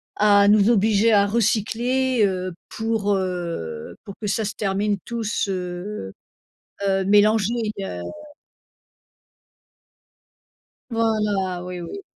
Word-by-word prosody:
à 205 -1 +5
nous 210 +1 +5
obliger 220 0 +3
à 200 -1 +5
recycler, 235 +3 +1
heu, 185 -1 -2 0.2
pour, 220 -2 0
heu, 170 - -4
pour 200 - -8
que 210 - -3
ça 215 +2 0
se 205 - -3
termine 200 0 -1
tous 230 -3 -2
heu 180 - -5 0.8
heu, 195 0 +1
mélangé, 210 +2 +4 0.3
heu 90 - -5 2.9
Voilà, 210 -5 0
oui 180 0 -6
oui. 395 - -7
205 Hz, 105 wpm, -23 LUFS, 190-220 Hz, 2.9 s, à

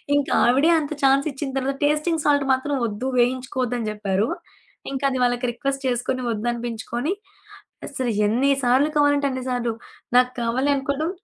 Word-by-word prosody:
ఇంకా 285 -1 0 0.2
ఆవిడే 275 +7 +4
అంత 295 0 -5
ఛాన్స్ 275 +2 +4
ఇచ్చిన 270 0 -5
తర్వాత 275 +1 -2
"టేస్టింగ్ 305 +2 +1
సాల్ట్ 285 -1 +3
మాత్రం 270 +2 -1
వద్దు 225 +5 -3
వేయించుకోవద్దు" 255 0 0
అని 220 - -2
జెప్పారు. 205 0 -1 0.7
ఇంకా 275 +1 -2
అది 260 - -2
వాళ్ళకి 245 +1 0
రిక్వెస్ట్ 275 +2 -3
చేసుకొని 255 +1 -1
వద్దనిపించుకొని, 240 - -3 0.8
అసలు 255 -4 -2 0.2
ఎన్ని 255 +6 +2
సార్లు 260 +5 +3
కావాలంటే 285 -1 +3
అన్ని 260 -1 -4
సార్లు. 240 -2 -1 0.4
నాకు 250 0 +5
కావాలి 260 +5 +1
అనుకోడం, 280 +5 -2
260 Hz, 150 wpm, -23 LUFS, 240-280 Hz, 0.8 s, నాకు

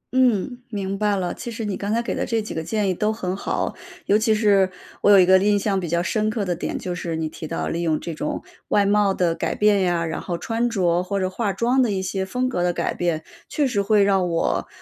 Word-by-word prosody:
嗯， 245 -1 +2
明 195 -3 -3
白 210 -1 +2
了。 180 -2 -2
其 240 - -7
实 225 -1 -5
你 205 -2 -2
刚 200 +2 -3
才 230 - +2
给 235 - -2
的 - - -2
这 230 - 0
几 215 - -5
个 160 - -3
建 210 +3 -1
议 185 - +1
都 210 +4 0
很 185 -4 -3
好。 195 - -2 0.3
尤 200 - +3
其 220 0 +3
是 200 -3 +3 0.3
我 - - +4
有 200 - +8
一 185 - +6
个 190 +1 +6
印 205 +1 +3
象 195 -1 0
比 175 - -4
较 170 +1 +1
深 215 +3 0
刻 215 -2 -2
的 175 -2 -1
点， - - -3
就 180 -2 -4
是 170 -2 -4
你 160 0 -2
提 155 0 -8
到 - - -3
利 170 +1 -2
用 160 -2 +1
这 170 - -5
种 150 -1 -4 0.2
外 205 - +3
貌 205 0 +3
的 175 -2 +1
改 - - -2
变 210 -2 +3
呀， 175 -2 +1
然 160 - -4
后 175 -2 -3
穿 230 +5 -1
着 180 -6 +1
或 195 +2 -2
者 185 - 0
化 210 0 -1
妆 240 +7 +2
的 245 - +2
一 190 -2 -1
些 190 0 -2
风 250 +6 -1
格 215 -9 -2
的 175 - +2
改 - - -1
变， 165 -3 -1 0.3
确 295 - +1
实 235 -7 +1
会 205 0 +3
让 195 -3 +2
我 165 - 0
195 Hz, 285 characters per minute, -23 LUFS, 175-215 Hz, 0.3 s, 有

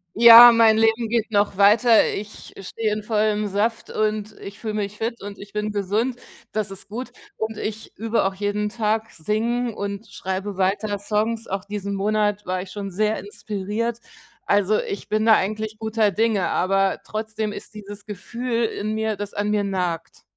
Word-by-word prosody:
Ja, 235 +1 +11
mein 225 -1 +5
Leben 225 +1 +2
geht 225 0 -1
noch 205 -1 +2
weiter. 215 +4 +5
Ich 210 +1 -8
stehe 215 +3 -3
in 210 0 -2
vollem 210 -1 0
Saft 210 +3 -1
und 215 0 -2
ich 200 0 -9
fühle 215 -2 -4
mich 210 -1 -3
fit 230 +2 -3
und 200 0 -8
ich 200 0 -12
bin 210 0 -2
gesund. 210 +5 -1 0.3
Das 215 -2 -1
ist 195 0 -5
gut. 245 +5 -6 0.3
Und 220 0 -3
ich 220 0 -6
übe 225 0 0
auch 195 - 0
jeden 205 +1 -1
Tag 220 0 -1
Singen 230 +6 -1
und 200 +2 -5
schreibe 190 +1 -4
weiter 200 +2 0
Songs. 220 +3 -1
Auch 195 0 -3
diesen 200 -1 -4
Monat 210 0 0
war 185 0 -2
ich 185 - -9
schon 200 -2 -6
sehr 215 +3 0
inspiriert. 210 +3 -4 0.5
Also 205 +1 +2
ich 200 - -6
bin 215 +1 0
da 225 -1 +7
eigentlich 215 +2 -2
guter 220 -1 +1
Dinge, 220 -3 +1
aber 195 +1 +1
trotzdem 215 0 -3
ist - - -8
dieses 205 -1 -9
Gefühl 235 +3 -3
in 215 0 -3
mir, 220 -1 -1
das 205 0 -6
an 205 +1 -1
mir 210 -1 +1
nagt. 180 -4 -3
210 Hz, 175 wpm, -23 LUFS, 200-220 Hz, 0.5 s, Ja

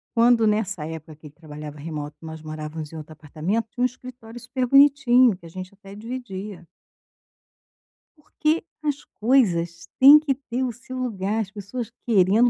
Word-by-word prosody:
Quando, 230 -1 +5
nessa 210 -6 0
época 160 -1 -8
que 155 0 -13
ele 145 - -15
trabalhava 150 -2 -9
remoto, 150 -1 -6
nós 160 -1 -8
morávamos 155 0 -6
em 165 - -8
outro 155 0 -9
apartamento, 160 +9 -3
tinha 245 - -7
um - - +5
escritório 245 -2 -7
super 250 +1 -2
bonitinho 255 -5 +5
que 170 - -17
a - - -10
gente 185 +3 -8
até 195 -1 -14
dividia. 210 -6 -7 1.5
Porque 305 +2 -1 0.2
as 295 -2 -2
coisas 175 -9 +1
têm 280 +3 +10
que 300 -3 0
ter 255 -1 -4
o 255 - -1
seu 255 +2 -9
lugar, 215 -4 -2
as 195 -3 -3
pessoas 220 +3 -6
querendo, 215 +2 +4
210 Hz, 165 wpm, -24 LUFS, 165-250 Hz, 1.5 s, têm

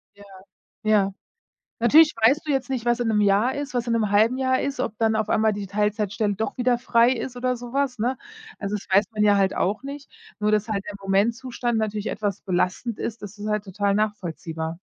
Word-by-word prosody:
Ja. 205 - -15 0.6
Ja. 205 -2 +2 0.7
Natürlich 300 +7 +6
weißt 250 +8 +3
du 295 - +1
jetzt 265 -2 -1
nicht, 250 -3 -3
was 240 0 +2
in 230 - 0
'nem 210 - +2
Jahr 205 +6 +3
ist, 285 -2 -5
was 245 -1 -1
in 230 - +1
'nem 220 -3 +1
halben 220 +5 +3
Jahr 260 -1 +1
ist, 275 -2 -3
ob 220 -4 -2
dann 220 -1 +2
auf 215 - -1
einmal 220 0 +3
die 200 -1 -5
Teilzeitstelle 210 0 0
doch 220 +3 -3
wieder 245 -1 +2
frei 235 0 +3
ist 250 0 -4
oder 250 0 -1
sowas, 250 0 -2
ne? 250 +3 0 0.4
Also 200 0 -3
das 205 - -7
weiß 200 - +5
man 210 -1 0
ja 205 -1 +5
halt 195 -1 +2
auch 210 +7 -1
nicht, 280 +1 -8 0.3
nur 210 0 +1
dass 215 +1 +1
halt 200 -2 -2
der 205 - -6
Momentzustand 230 +4 0
natürlich 215 -1 -2
etwas 205 -2 -3
belastend 190 +4 -1
ist, 230 -1 -5
das 205 +1 -9
ist 210 - -6
halt 210 -1 -1
total 200 +1 0
nachvollziehbar. 170 -6 -3
220 Hz, 215 wpm, -24 LUFS, 205-245 Hz, 0.7 s, Natürlich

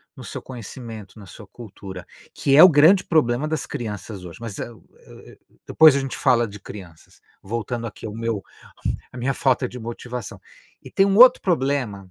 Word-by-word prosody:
no - - -11
seu - - -7
conhecimento, 115 -3 -10
na 100 - -12
sua 105 +3 -13
cultura, 95 -4 -11 0.3
que 135 - +1
é 155 - +10
o 185 - +10
grande 165 +5 +5
problema 145 -3 +1
das 155 -2 -2
crianças 105 -3 -7
hoje. 85 -2 -10
Mas 115 -4 -7
é 120 - -5
o 110 - -17 0.2
é - - -16
é - - -16
o - - -22 0.3
depois 155 -2 +6
a - - +1
gente 135 -1 -4
fala 120 -1 +2
de 105 -1 -10
crianças, 95 -5 -13 0.2
voltando 115 +3 -4
aqui 105 - -10
ao 105 - -6
meu 115 -2 -3 0.7
a - - -12
minha 125 +2 -1
falta 130 -1 +1
de 125 - -9
motivação. 120 -1 -7 0.4
E - - -12
tem 195 - +3
um 195 0 +1
outro 250 +2 +8
problema 130 - -1
120 Hz, 200 wpm, -22 LUFS, 105-140 Hz, 0.7 s, é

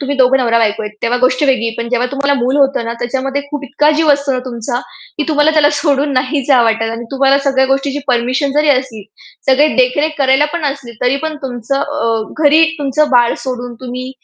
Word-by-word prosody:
तुम्ही 280 0 -3
दोघं 260 0 +4
नवरा-बायको 230 -3 +1
आहेत." 210 0 -7
तेव्हा 240 +1 0
गोष्ट 255 +2 +2
वेगळी 260 -4 +1
आहे. 225 - -3
पण 235 - -3
जेव्हा 245 0 +1
तुम्हाला 280 +1 0
मूल 255 +4 0
होतं 275 -4 +2
ना, 230 - -3
त्याच्यामध्ये 270 +3 -2
खूप 290 -2 -5
इतका 285 +3 +1
जीव 315 -1 +3
असतो 280 -1 -1
ना 255 - -1
तुमचा, 240 0 -4 0.4
की 300 - 0
तुम्हाला 295 0 +3
त्याला 305 -2 +3
सोडून 285 -2 +1
नाही 265 +2 0
जावं 255 -4 +5
वाटत. 225 0 0
आणि 230 +1 -6
तुम्हाला 275 0 +2
सगळ्या 265 -1 +2
गोष्टीची 275 +1 -1
परमिशन 255 +3 0
जरी 300 +1 +1
असली, 255 -6 0 0.4
सगळे 275 +3 +4
देखरेख 260 +4 +2
करायला 270 +1 +3
पण 340 -2 -3
असली, 275 -4 -4
तरी 250 +2 +2
पण 315 -1 -3
तुमचं 255 +1 -3
अ, 255 -7 -1 0.2
घरी 305 +3 +6
तुमचं 290 +1 0
बाळ 240 -2 +3
सोडून 245 -2 -5
तुम्ही 255 0 -6
265 Hz, 205 wpm, -14 LUFS, 245-285 Hz, 0.4 s, घरी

